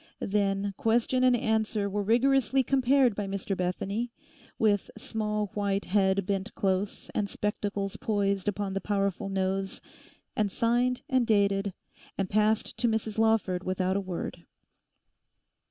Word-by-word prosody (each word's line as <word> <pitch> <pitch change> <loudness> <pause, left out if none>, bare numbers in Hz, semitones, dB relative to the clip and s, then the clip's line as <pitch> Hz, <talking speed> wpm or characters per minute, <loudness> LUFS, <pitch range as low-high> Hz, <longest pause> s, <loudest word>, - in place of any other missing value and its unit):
Then 200 0 0
question 240 +3 +2
and 255 -1 +5
answer 220 -2 0
were 205 +1 -1
rigorously 265 +4 +3
compared 260 -1 +3
by 200 0 -3
Mr 195 0 -3
Bethany, 195 +6 -2 0.5
with 210 -5 +2
small 210 -2 -2
white 200 -1 -1
head 195 -1 +2
bent 195 +1 -2
close 195 -1 -1
and 205 -1 -1
spectacles 200 -1 -2
poised 200 -5 0
upon 205 -1 -1
the 195 - -2
powerful 200 -2 -1
nose, 195 0 -1 0.6
and 210 -2 +1
signed 245 +4 +1
and 260 -5 +2
dated, 200 -2 +2 0.4
and 195 -1 -2
passed 215 +1 +1
to 240 - +2
Mrs 220 -1 -1
Lawford 220 -5 +2
without 185 0 0
a 200 - +1
word. 185 -3 -6
205 Hz, 135 wpm, -28 LUFS, 195-225 Hz, 0.6 s, and